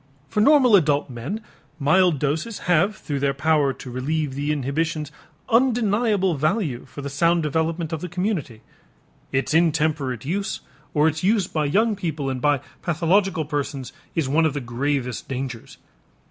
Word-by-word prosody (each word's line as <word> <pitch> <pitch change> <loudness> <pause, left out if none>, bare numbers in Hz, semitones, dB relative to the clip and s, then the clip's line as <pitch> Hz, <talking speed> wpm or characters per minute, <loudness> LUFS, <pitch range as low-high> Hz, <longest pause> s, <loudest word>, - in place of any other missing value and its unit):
For 210 - +1
normal 260 -3 +6
adult 145 -6 +2
men 145 - -5 0.3
mild 165 +3 +3
doses 155 - -2
have 180 +4 +3
through 145 -2 -4
their 140 0 0
power 150 -1 +2
to 130 - -9
relieve 145 +3 -2
the 145 +2 -1
inhibitions 150 +2 -2 0.4
undeniable 225 -5 +2
value 155 - -1
for 145 - -9
the - - -3
sound 170 +3 +2
development 160 +2 -1
of 160 - -3
the 180 - -5
community. 175 - -2 0.7
Its 135 +2 0
intemperate 150 -6 +1
use 195 +6 -2 0.3
or 150 +1 +4
its 160 +1 -1
use 200 0 +3
by 155 -3 -1
young 215 +9 +2
people 155 -8 -3
and 130 -1 -4
by 145 -1 +2 0.2
pathological 175 +1 +1
persons 140 -2 -4 0.2
is 160 -5 0
one 160 +4 +3
of 150 - -4
the - - -1
gravest 125 0 -2
dangers. 130 -3 -5
155 Hz, 155 wpm, -23 LUFS, 140-180 Hz, 0.7 s, normal